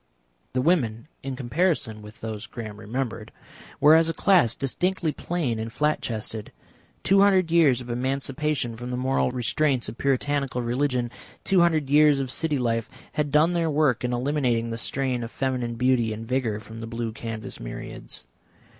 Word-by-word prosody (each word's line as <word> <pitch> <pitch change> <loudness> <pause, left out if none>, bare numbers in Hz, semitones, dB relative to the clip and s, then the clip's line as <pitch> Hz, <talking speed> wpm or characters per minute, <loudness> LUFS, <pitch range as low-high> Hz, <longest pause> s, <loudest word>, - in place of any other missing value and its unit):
The 125 0 +1
women, 130 -8 +1
in 135 -1 -4
comparison 130 -4 0
with 105 +1 -13
those 110 -1 -5
Graham 110 -3 -7
remembered, 115 -1 -4 0.5
were 150 +1 +7
as 165 0 +5
a 165 - -2
class 180 - +4
distinctly 170 +4 0
plain 150 -10 -2
and 115 +1 -4
flat 150 +5 +1
chested. 110 -1 -4 0.5
Two 195 +1 +5
hundred 190 -4 +4
years 150 -7 +4
of 125 - -9
emancipation 135 0 -1
from 120 +2 -7
the 125 - -2
moral 130 +1 +1
restraints 130 +1 0
of 115 - -10
Puritanical 140 -2 0
religion, 125 0 0 0.3
two 190 -2 +4
hundred 160 -4 +3
years 145 0 +5
of 130 -2 -3
city 155 -1 0
life, 115 -3 -1 0.2
had 150 -1 -1
done 155 +4 +4
their 170 -2 +1
work 145 -5 +2
in 125 - 0
eliminating 125 -3 0
the 115 - -3
strain 125 +4 -1
of 115 - -5
feminine 125 -2 -2
beauty 125 -2 +2
and 110 +1 -7
vigour 120 -4 0
from 110 +1 -10
the 115 - -5
blue 115 0 -3
canvas 110 -1 -6
myriads. - - -6
130 Hz, 170 wpm, -25 LUFS, 115-150 Hz, 0.5 s, were